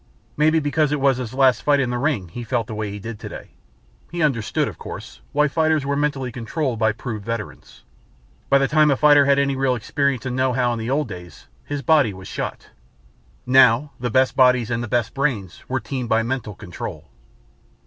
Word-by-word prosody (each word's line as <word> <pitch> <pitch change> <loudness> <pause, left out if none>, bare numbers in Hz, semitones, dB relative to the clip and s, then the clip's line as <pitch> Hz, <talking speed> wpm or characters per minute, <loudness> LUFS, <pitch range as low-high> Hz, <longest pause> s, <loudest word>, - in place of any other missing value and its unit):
Maybe 155 +2 +3
because 150 0 +1
it 150 - 0
was 135 -2 +3
his 125 -4 -5
last 130 -2 +3
fight 145 -1 +3
in 130 -3 0
the 120 - -2
ring 125 - -1
he 120 +8 -7
felt 115 0 -1
the 110 - -7
way 105 -1 -3
he 100 - -6
did 110 +1 -7
today. - - -9 0.6
He 175 -1 -1
understood, 125 -8 0
of - - -8
course, 60 - -9
why 150 0 +3
fighters 155 -1 +1
were 140 0 0
mentally 140 -3 -1
controlled 120 +1 -3
by 110 -1 +3
proved 110 -1 -6
veterans. 115 -1 -7 0.7
By 140 - +6
the 135 0 +2
time 155 0 +4
a 140 - +2
fighter 145 -1 +6
had 140 0 +4
any 140 -1 +1
real 135 -1 +1
experience 135 +3 -1
and 130 -1 -2
know 130 0 +1
how 125 -1 +1
in 115 - -4
the 110 +2 -4
old 145 +2 0
days, 90 -6 -10 0.2
his 145 -1 -5
body 130 -8 +3
was 95 0 -10
shot. - - -5 0.8
Now 130 +2 +5
the 125 0 -2
best 130 +3 +2
bodies 125 -3 +4
and 115 0 -1
the - - -4
best 120 0 0
brains 125 - -2
were 130 +1 0
teamed 120 +1 -5
by 110 0 +3
mental 115 -4 -3
control. 90 -4 -8
130 Hz, 210 wpm, -22 LUFS, 115-140 Hz, 0.8 s, By